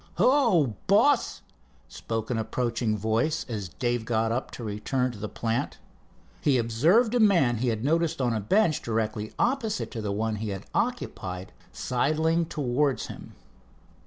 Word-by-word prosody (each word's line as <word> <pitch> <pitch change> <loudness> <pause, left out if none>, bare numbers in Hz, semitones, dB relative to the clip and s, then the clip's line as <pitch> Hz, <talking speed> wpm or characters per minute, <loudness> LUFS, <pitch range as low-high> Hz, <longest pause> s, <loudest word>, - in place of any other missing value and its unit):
"Hello, 230 - +3
boss," 250 +8 +3 0.4
spoke 115 +1 -4
an 115 - 0
approaching 115 -1 -1
voice 115 +10 0
as 105 -7 -4
Dave 120 +2 -1
got 110 0 0
up 125 +3 -2
to 120 - -8
return 125 +5 -1
to 110 - -11
the 105 +1 -4
plant. 115 +1 -2 0.6
He 140 -3 +3
observed 160 - +3
a 245 - +2
man 170 - +4
he 125 +3 -1
had 110 -1 -1
noticed 165 +2 +1
on 125 -3 +1
a 110 - 0
bench 155 - +2
directly 110 -1 -2
opposite 235 -4 0
to 115 - -5
the 105 -2 -2
one 110 +1 -1
he 110 0 -4
had 95 0 -5
occupied 95 - -3 0.2
sidling 160 +6 0
towards 140 -2 0
him. - - -13
120 Hz, 155 wpm, -27 LUFS, 110-165 Hz, 0.6 s, man